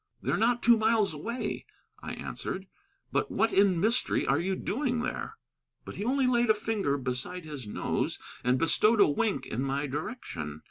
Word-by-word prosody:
"They're - - 0
not 235 +3 +2
two 235 -1 +6
miles 220 -4 +2
away," 230 +12 -4 0.3
I - - -5
answered. 190 +1 -5 0.5
"But 430 - 0
what 225 +1 +1
in 195 -3 +4
mystery 225 +7 +1
are 140 +2 +2
you 190 +3 0
doing 245 +4 -1
there?" 440 - -4 0.5
But - - -8
he - - -3
only 265 +3 +2
laid 240 -2 +3
a 215 - +6
finger 210 -10 -1
beside 135 +7 -3
his 145 -7 -6
nose - - -1 0.3
and 125 +1 +3
bestowed 210 - +4
a - - +7
wink 205 +8 0
in 115 - -3
my 140 +2 -1
direction. 135 - -5
200 Hz, 175 wpm, -29 LUFS, 145-235 Hz, 0.5 s, a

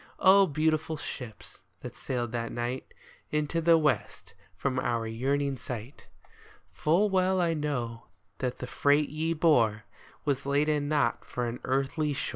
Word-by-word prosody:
Oh, 195 +1 +6
beautiful 155 +1 0
ships, 115 -7 -8 0.2
that - - -8
sailed 120 -3 -3
that 115 -1 -3
night 120 +2 -4 0.4
Into 150 +2 0
the 165 0 +6
west 155 -2 -1 0.2
from 130 -2 -1
our 115 -3 -1
yearning 135 +5 -1
sight. 120 +2 -7 0.6
Full 175 +7 +2
well 185 0 +2
I 170 -2 +2
know 125 -7 -3 0.3
that 125 -2 -2
the - - -5
freight 145 +3 +2
ye 160 +2 -1
bore 120 -10 +3 0.4
Was 140 -2 -1
laden 145 +1 +1
not 145 -6 +1
for 125 - -3
an 120 +1 -4
earthly 140 +3 0
shore - - -2
145 Hz, 145 wpm, -29 LUFS, 125-155 Hz, 0.6 s, Oh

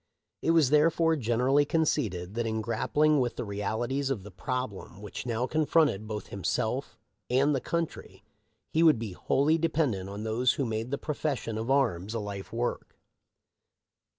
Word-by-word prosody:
It - - -1
was 160 -5 +4
therefore 165 +2 +4
generally 130 +2 +2
conceded 115 - 0
that 115 0 -1
in 110 0 -1
grappling 145 +7 +2
with 125 -2 0
the - - -4
realities 115 +7 -2
of 120 -8 -2
the 105 - -10
problem 125 -1 -4
which 105 +4 -7
now 120 +1 0
confronted 150 -7 +2
both 105 -2 -5
himself 100 -2 -2 0.3
and 135 +4 +3
the 135 - 0
country 170 -1 -4 0.5
he 160 - +2
would 160 -6 +6
be 110 -3 -5
wholly 150 - +2
dependent 145 - 0
on 100 +2 -6
those 115 +3 +2
who 140 - -1
had 120 - -2
made 110 +2 -2
the 140 - -1
profession 145 -7 -3
of 110 +3 -3
arms 115 -7 +1
a - - 0
life 100 -3 -6
work. 120 +1 -3
125 Hz, 165 wpm, -29 LUFS, 110-145 Hz, 0.5 s, would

